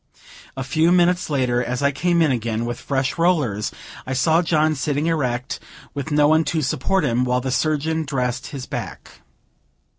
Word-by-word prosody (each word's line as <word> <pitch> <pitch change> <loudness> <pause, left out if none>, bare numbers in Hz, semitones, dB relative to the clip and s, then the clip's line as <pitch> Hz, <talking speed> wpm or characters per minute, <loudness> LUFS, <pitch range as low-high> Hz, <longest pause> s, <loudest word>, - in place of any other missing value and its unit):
A 135 - -2
few 155 +5 +2
minutes 180 0 +3
later, 125 -4 +1
as 125 +2 -3
I 140 - +3
came 170 +4 +2
in 155 - +2
again, 115 -2 -1
with 120 0 -4
fresh 135 +3 -2
rollers, 145 - +1 0.4
I 130 - -2
saw 160 +6 +3
John 155 -2 +2
sitting 145 +1 -1
erect, 130 -6 -1 0.3
with 140 +1 -4
no 150 -1 +4
one 160 +1 +4
to 160 -2 -1
support 155 +7 0
him, 125 -1 +1
while 125 0 +1
the 130 +1 -3
surgeon 155 +4 0
dressed 125 -3 -2
his 135 -3 -7
back. - - -7
140 Hz, 175 wpm, -21 LUFS, 125-160 Hz, 0.4 s, no